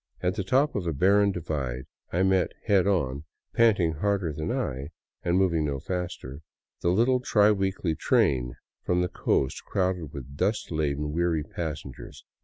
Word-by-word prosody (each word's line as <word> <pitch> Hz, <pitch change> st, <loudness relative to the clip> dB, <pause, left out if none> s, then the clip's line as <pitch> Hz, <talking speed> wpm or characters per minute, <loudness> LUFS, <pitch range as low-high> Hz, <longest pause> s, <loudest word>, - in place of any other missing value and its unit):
At 90 Hz, 0 st, +2 dB
the 100 Hz, -1 st, -3 dB
top 135 Hz, +10 st, +2 dB
of 95 Hz, -4 st, -2 dB
a 80 Hz, -, 0 dB
barren 100 Hz, +6 st, +4 dB
divide 70 Hz, -8 st, -3 dB, 0.3 s
I 90 Hz, +2 st, +1 dB
met 95 Hz, -2 st, +2 dB
head 100 Hz, -2 st, +3 dB
on, 75 Hz, -8 st, 0 dB, 0.3 s
panting 100 Hz, -8 st, +4 dB
harder 95 Hz, 0 st, 0 dB
than 75 Hz, +2 st, -3 dB
I, 65 Hz, +2 st, -2 dB, 0.3 s
and 85 Hz, +1 st, +1 dB
moving 85 Hz, -5 st, +2 dB
no 70 Hz, -2 st, -2 dB
faster, 80 Hz, -5 st, -5 dB, 0.4 s
the 85 Hz, -, +1 dB
little 120 Hz, +8 st, +3 dB
tri 105 Hz, -4 st, +4 dB
weekly 95 Hz, -4 st, 0 dB
train 65 Hz, -5 st, +1 dB, 0.3 s
from 90 Hz, 0 st, +1 dB
the 90 Hz, -, 0 dB
coast, 65 Hz, -6 st, 0 dB
crowded 90 Hz, -5 st, -1 dB
with 70 Hz, -1 st, -9 dB
dust 105 Hz, +7 st, -1 dB
laden, 75 Hz, -1 st, -1 dB
weary 85 Hz, -2 st, +1 dB
passengers. 75 Hz, -5 st, -7 dB
85 Hz, 160 wpm, -27 LUFS, 75-95 Hz, 0.4 s, barren